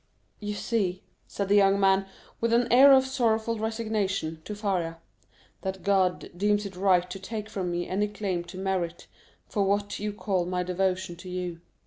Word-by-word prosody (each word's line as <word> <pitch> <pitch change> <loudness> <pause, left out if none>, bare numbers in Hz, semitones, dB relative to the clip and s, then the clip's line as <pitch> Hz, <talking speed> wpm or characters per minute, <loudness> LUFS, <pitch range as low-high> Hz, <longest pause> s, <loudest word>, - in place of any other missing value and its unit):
"You 210 -1 -4
see," 195 -4 -1 0.2
said 200 - -3
the 200 - +4
young 200 -1 +5
man, 195 0 +3 0.3
with 230 0 +1
an 240 0 +3
air 270 +3 +9
of 265 -1 +6
sorrowful 230 -4 0
resignation, 215 -7 -2
to 210 - -5
Faria, 185 -6 -1 0.6
"that 190 0 -4
God 190 -2 +1
deems 205 +2 +1
it 195 -2 -7
right 180 -1 +3
to 180 +1 -7
take 215 +1 -5
from 190 -4 -3
me 175 0 -2
any 205 +3 0
claim 200 -4 -3
to 175 +1 -10
merit 185 -3 -2 0.4
for 205 - 0
what 205 +1 0
you 210 0 -2
call 195 -4 -1
my 180 0 -1
devotion 185 0 -1
to 185 +1 -10
you. 180 -2 -4
195 Hz, 175 wpm, -27 LUFS, 180-210 Hz, 0.6 s, air